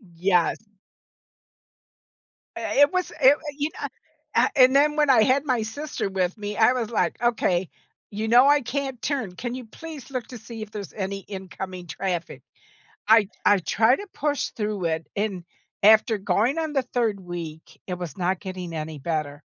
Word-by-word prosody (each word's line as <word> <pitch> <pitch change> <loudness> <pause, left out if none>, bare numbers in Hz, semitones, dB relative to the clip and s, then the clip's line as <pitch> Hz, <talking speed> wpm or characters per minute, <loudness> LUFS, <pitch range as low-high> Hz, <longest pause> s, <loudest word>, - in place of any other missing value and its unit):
Yes. 180 -1 +2 2.0
Eh - - -3
it 285 - +6
was 365 -1 -1
i 265 +1 +8 0.2
you 295 +1 0
kn - - -5 0.5
Ah - - +5
and 260 -1 +6
then 295 +2 +4
when 300 -2 +3
I 250 -5 +6
had 265 +5 +2
my 255 -5 +1
sister 280 0 -4
with 190 +1 -1
me, 210 0 -5
I 225 +3 +5
was 240 -4 -2
like, 230 - 0
"Okay, 190 -7 +1 0.4
you 215 +2 -3
know 245 +4 +6
I 290 0 +6
can't 265 0 -4
turn, 260 -11 -2
can 240 +4 -4
you 255 -2 -7
please 300 +4 -10
look 255 -3 -4
to 250 - -9
see 225 0 -9
if 215 -1 -7
there's 205 -3 -7
any 195 -1 -3
incoming 190 -2 -7
traffic?" 175 0 -4 0.7
I 220 -2 +6 0.2
I 205 -1 +5
tried 220 +7 +3
to 405 - -8
push 295 -2 -1
through 210 -4 -3
it, 160 +1 -5
and 200 -3 -2 0.4
after 220 +2 +6
going 225 +7 +1
on 315 -2 -2
the 270 - +2
3rd 235 -5 -1
week, 170 -3 -8
it 180 - -2
was 175 -4 -7
not 185 0 0
getting 185 -3 -6
any 155 -1 -5
better. 150 -1 -3
215 Hz, 175 wpm, -25 LUFS, 185-255 Hz, 2.0 s, i